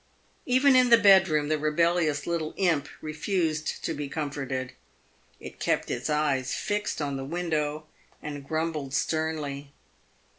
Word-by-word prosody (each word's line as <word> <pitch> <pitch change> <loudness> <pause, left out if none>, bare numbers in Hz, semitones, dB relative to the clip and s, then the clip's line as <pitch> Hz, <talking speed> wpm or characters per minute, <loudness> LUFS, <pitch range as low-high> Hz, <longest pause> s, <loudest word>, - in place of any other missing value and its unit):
Even 260 +2 +5
in 250 -1 +5
the 235 - +8
bedroom 190 -8 +5
the 155 0 0
rebellious 155 -1 +1
little 165 -2 -2
imp 165 -7 +1
refused 155 0 -2
to 165 - -1
be 145 -2 -5
comforted. 135 -4 -4 0.7
It - - -10
kept - - 0
its - - -3
eyes 145 -4 0
fixed 205 -6 -2
on 140 -1 -2
the 135 - -5
window, 155 -1 -2 0.3
and 145 -2 -7
grumbled 155 -2 -3
sternly. 150 -3 -2
155 Hz, 135 wpm, -27 LUFS, 145-170 Hz, 0.7 s, the